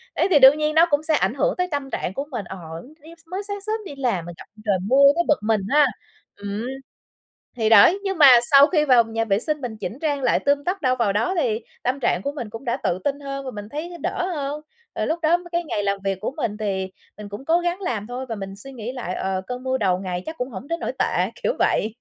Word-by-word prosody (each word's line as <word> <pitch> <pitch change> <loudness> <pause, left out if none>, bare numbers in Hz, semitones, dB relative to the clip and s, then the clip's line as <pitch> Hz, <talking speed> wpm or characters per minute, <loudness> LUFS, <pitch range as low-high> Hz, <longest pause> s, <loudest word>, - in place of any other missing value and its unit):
Đấy, - - +2
thì 295 - +6
đương 270 +3 +8
nhiên 305 0 0
nó 325 +1 +7
cũng 290 +1 +1
sẽ 315 - +1
ảnh - - +1
hưởng - - 0
tới 360 0 0
tâm 285 -2 -3
trạng 185 - -3
của 275 +7 -4
mình, 215 -7 -4
ờ, 190 +2 -8 0.3
tự 305 +4 -19
nhiên 335 +1 -13
sao 325 - -23
mới 385 +2 -3
sáng 405 -1 -5
sớm 430 +2 -2
đi 285 - -8
làm 235 -11 -1
mình 175 0 -9
gặp - - -11 0.2
trời 200 -2 +2
mưa 275 +3 +5
tới 345 - +2
bực 300 - +3
mình 215 -1 +1
ha 295 +1 +5 0.5
ừm, 205 +3 -5 0.9
thì 220 -2 +1
đấy, 225 - +7
nhưng 385 -3 -2
mà 295 - +8 0.2
sau 280 +1 +8
khi 305 -4 +2
vào 250 -4 +6
nhà 225 0 -2
vệ 200 -2 +1
sinh 300 +4 -2
mình 235 -4 -5
chỉnh 225 +4 -6
trang 290 -3 -1
lại 250 - +3
tươm 285 0 +1
tất 365 +2 -2
đâu 255 -2 +2
vào 230 -5 +1
đó, 225 - 0
thì 225 -5 0 0.2
tâm 255 +3 -1
trạng 230 -8 +1
của 280 - -1
mình 245 -7 -6
cũng 225 +4 -9
đã 240 +1 0
tự 185 -9 -1
tin 285 0 -1
hơn 275 -1 -6
và 260 - -4
mình 205 -1 -8
thấy 335 +6 -6
đỡ 365 -2 -1
hơn. 290 +1 -4 0.3
Rồi - - -1
lúc 325 +2 -1
đó 330 +2 +4
cái 345 0 0
ngày 210 -10 -3
làm 200 0 0
việc 195 -1 -1
của - - -2
mình 220 -7 -2
thì 190 -3 -2 0.3
mình 210 -1 -9
cũng 205 +7 -8
cố 335 +2 +3
gắng 350 +2 -2
làm 220 - -3
thôi 250 +2 -5
và 225 - -3
mình 195 -1 -7
suy 240 +7 -11
nghĩ 235 0 -5
lại, 235 -8 -5
ờ, 190 -1 -2
cơn 250 0 -5
mưa 260 0 0
đầu 185 -6 +1
ngày 180 -1 -4
chắc 320 +1 -6
cũng 250 +1 -3
hổng 230 +3 -8
đến 335 +2 -2
nỗi - - -3
tệ, - - +1
kiểu - - +1
vậy. 220 +1 +1
260 Hz, 275 wpm, -23 LUFS, 210-305 Hz, 0.9 s, đương